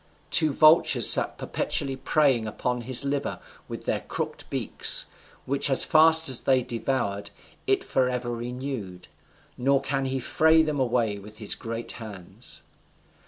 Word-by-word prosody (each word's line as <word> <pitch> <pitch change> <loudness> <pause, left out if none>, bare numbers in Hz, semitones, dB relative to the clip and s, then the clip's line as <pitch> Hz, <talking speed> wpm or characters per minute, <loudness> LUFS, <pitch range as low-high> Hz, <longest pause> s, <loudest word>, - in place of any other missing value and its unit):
Two 160 -3 +3
vultures 155 +3 +5
sat - - +5
perpetually 135 -1 -2
preying 130 -4 +1
upon 125 +3 -3
his 130 +3 +2
liver 140 0 -3 0.3
with - - -9
their - - -1
crooked - - -6
beaks; - - +1 0.4
which 140 +2 0
as 135 - +4
fast 160 +1 +5
as 130 -3 +3
they 130 -2 +1
devoured, 115 -5 -3 0.4
is - - 0
forever 125 -2 -1
renewed; 120 -6 -7 0.5
nor 135 +2 +2
can 135 0 -3
he 135 0 -3
fray 160 +5 +2
them 150 -2 -3
away 115 -5 -1
with 105 +2 -13
his 105 -2 +2
great 115 +1 -6
hands. 105 -6 -10
130 Hz, 140 wpm, -25 LUFS, 115-140 Hz, 0.5 s, vultures